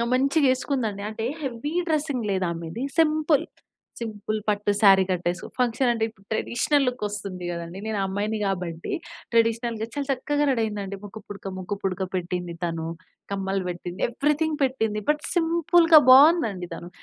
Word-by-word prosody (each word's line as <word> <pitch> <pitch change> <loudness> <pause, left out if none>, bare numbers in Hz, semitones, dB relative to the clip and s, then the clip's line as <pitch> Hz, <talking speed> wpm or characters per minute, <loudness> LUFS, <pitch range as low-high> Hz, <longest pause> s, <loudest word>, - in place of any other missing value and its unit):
మంచిగా 275 +2 +3
ఎసుకుందండి. 230 -7 -2
అంటే, 220 +1 -5 0.2
heavy 270 +4 -4 0.2
dressing 290 -6 0
లేదు 190 -1 0
ఆమెది, 170 +7 -6 0.2
సింపుల్, 310 -2 +3 0.6
సింపుల్ 215 -1 -3
పట్టు 205 0 +1
శారీ 195 -2 +7
కట్టేసు 175 0 -2
ఫంక్షన్ 245 +1 +2
అంటే, 225 - -2
ఇప్పుడు 200 -3 -23
ట్రెడిషనల్‌ 275 +5 +1
లుకొస్తుంది 205 -6 -5
గదండీ! 170 +2 -6
నేను 215 -2 -1
అమ్మాయిని 205 +3 -2
గాబట్టి, 175 -4 -3 0.4
ట్రెడిషనల్‌గా 230 -1 +1
చాలా 285 -1 -2
చక్కగా 290 +3 0
రెడీ 235 -3 +1
అయిందండి. 200 -2 -4
ముక్కుపుడక, 205 -1 -9
ముక్కుపుడక 190 0 -3
పెట్టింది 180 -1 -3
తను, 165 -1 -2 0.5
కమ్మలు 195 -1 -1
వేట్టింది, 175 +1 -6
ఎవరీథింగ్ 300 +5 0
పెట్టింది. 225 -5 0
బట్, 300 0 +2
సింపుల్‌గా 335 -1 +5
బావుందండి 255 - +6
తను. 170 - -8
220 Hz, 135 wpm, -25 LUFS, 190-275 Hz, 0.6 s, శారీ